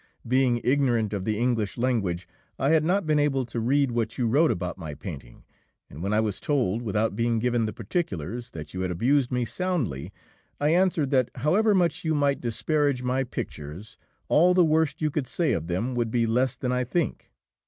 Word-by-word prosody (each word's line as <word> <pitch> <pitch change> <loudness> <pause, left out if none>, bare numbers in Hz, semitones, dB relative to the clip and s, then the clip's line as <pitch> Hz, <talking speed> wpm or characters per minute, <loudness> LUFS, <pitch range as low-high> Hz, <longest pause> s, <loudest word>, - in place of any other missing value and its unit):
Being 125 -1 +2
ignorant 120 -5 +2
of 95 -2 -3
the 110 -1 0
English 115 -3 0
language, 100 -9 -1 0.3
I 135 - +1
had 160 -1 +4
not 185 +3 +1
been 155 -1 +2
able 135 -3 +1
to 120 0 -4
read 135 +3 +2
what 115 -1 -2
you 125 - 0
wrote 145 +8 +3
about 90 0 -3
my 75 -3 -6
painting, 70 -11 -9 0.5
and 75 - -9
when 100 +3 -2
I 105 - +3
was 110 -3 -1
told, 120 -7 0
without 110 0 0
being 115 0 +1
given 120 -1 +1
the - - -3
particulars, 115 - -4
that 75 -5 -9
you 95 - -3
had 95 - -1
abused 125 +9 +1
me 125 -1 0
soundly, 115 - -2 0.5
I 145 - +2
answered 170 -4 +2
that, 130 -4 +3
however 195 - +2
much 175 -2 +1
you 160 -1 +1
might 140 -2 +1
disparage 125 +3 0
my 130 +1 0
pictures, 85 - -7 0.3
all 180 +4 +4
the 180 -2 +5
worst 155 -1 +1
you 155 - +1
could 140 -3 -2
say 170 +4 0
of 80 0 -2
them 95 +9 -1
would 120 -2 0
be 115 0 +1
less 125 +3 +1
than 125 - -2
I 125 0 +1
think. 155 +7 -2
125 Hz, 200 wpm, -26 LUFS, 110-145 Hz, 0.5 s, the